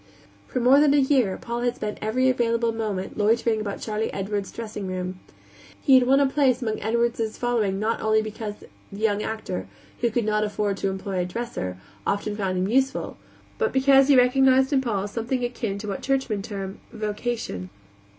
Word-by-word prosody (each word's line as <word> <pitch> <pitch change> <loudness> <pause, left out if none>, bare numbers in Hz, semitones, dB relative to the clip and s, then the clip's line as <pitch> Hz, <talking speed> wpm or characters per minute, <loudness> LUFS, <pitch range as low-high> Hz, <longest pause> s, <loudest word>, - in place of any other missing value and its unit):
For 255 - -2
more 255 +3 +6
than 290 -1 +5
a - - +5
year 265 -8 +3
Paul 235 0 -4
had 245 0 0
spent 210 -3 -5
every 245 +5 +1
available 235 -2 +2
moment 215 -3 -4
loitering 220 +1 +2
about 200 -2 -4
Charley 215 0 -2
Edwards's 200 0 -3
dressing 210 -3 -6
room. 185 0 -4 0.6
He 275 - +3
had 255 -1 +6
won 270 +1 +5
a 280 - +4
place 265 -2 +2
among 220 -4 -2
Edwards's 230 0 0
following 225 -6 0
not 220 +2 -1
only 220 0 +3
because 215 -1 -5 0.4
the 200 - -8
young 210 -1 +1
actor, 215 - -4 0.3
who 240 - +2
could 230 0 -1
not 215 0 +1
afford 205 -1 -1
to 195 - -1
employ 190 0 -3
a 180 - 0
dresser, 180 - -4 0.3
often 205 +1 -1
found 190 -3 -1
him 185 +1 0
useful, 265 +4 0 0.4
but 455 -1 +1
because 270 0 +5
he 280 -2 +6
recognized 265 +2 +4
in 270 - +4
Paul 205 -6 -1
something 235 +4 -2
akin 235 -4 -2
to 210 +1 -7
what 195 - -4
churchmen 265 -7 0
term 195 -2 -6
"vocation." 215 - -3
220 Hz, 185 wpm, -25 LUFS, 205-250 Hz, 0.6 s, more